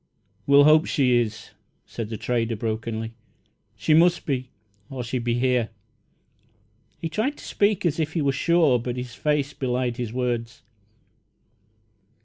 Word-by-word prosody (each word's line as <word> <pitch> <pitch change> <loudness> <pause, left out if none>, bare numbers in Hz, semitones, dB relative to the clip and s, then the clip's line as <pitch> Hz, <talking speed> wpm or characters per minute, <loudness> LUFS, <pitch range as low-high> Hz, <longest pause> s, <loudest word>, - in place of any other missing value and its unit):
"We'll 140 0 +7
hope 155 +2 +5
she 125 -4 +3
is," 110 -1 -6 0.3
said 115 -2 -6
the 110 - -4
trader, 115 -1 -1
brokenly. 110 +1 -3 0.6
"She 105 +9 +1
must 170 +2 +4
be, 130 -3 -2 0.4
or 130 -2 -5
she'd 120 0 -3
be 120 0 0
here!" 125 -2 +1 1.3
He 165 - -4
tried 220 - -2
to - - -12
speak 205 -1 +1
as 165 -1 0
if 160 0 -1
he 165 - 0
were 140 - +2
sure, 155 -3 +3
but 120 +1 -4
his 125 -1 -6
face 150 0 -1
belied 125 -2 -2
his 120 -3 -4
words. 120 -1 -3
125 Hz, 145 wpm, -24 LUFS, 115-150 Hz, 1.3 s, We'll